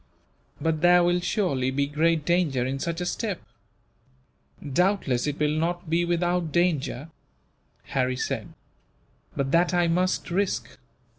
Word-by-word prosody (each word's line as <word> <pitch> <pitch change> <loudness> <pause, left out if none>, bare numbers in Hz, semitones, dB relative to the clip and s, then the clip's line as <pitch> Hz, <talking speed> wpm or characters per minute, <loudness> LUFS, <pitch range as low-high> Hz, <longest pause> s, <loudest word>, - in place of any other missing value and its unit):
"But 160 -1 -1
there 175 0 +6
will 175 +1 +2
surely 175 - 0
be 140 +2 0
great 155 +2 +1
danger 165 -8 +1
in 135 +1 -2
such 170 +3 -3
a - - -1
step?" 200 +1 -2 1.3
"Doubtless 150 -4 +1
it 145 0 -2
will 150 0 +1
not 170 +1 -2
be 170 +1 +2
without 175 -1 0
danger," 165 -3 0 0.7
Harry 130 -1 -1
said, - - -4 0.8
"but 135 -1 -1
that 175 +2 +3
I 175 -1 +3
must 180 +1 0
risk. 195 +2 -1
165 Hz, 135 wpm, -26 LUFS, 145-175 Hz, 1.3 s, there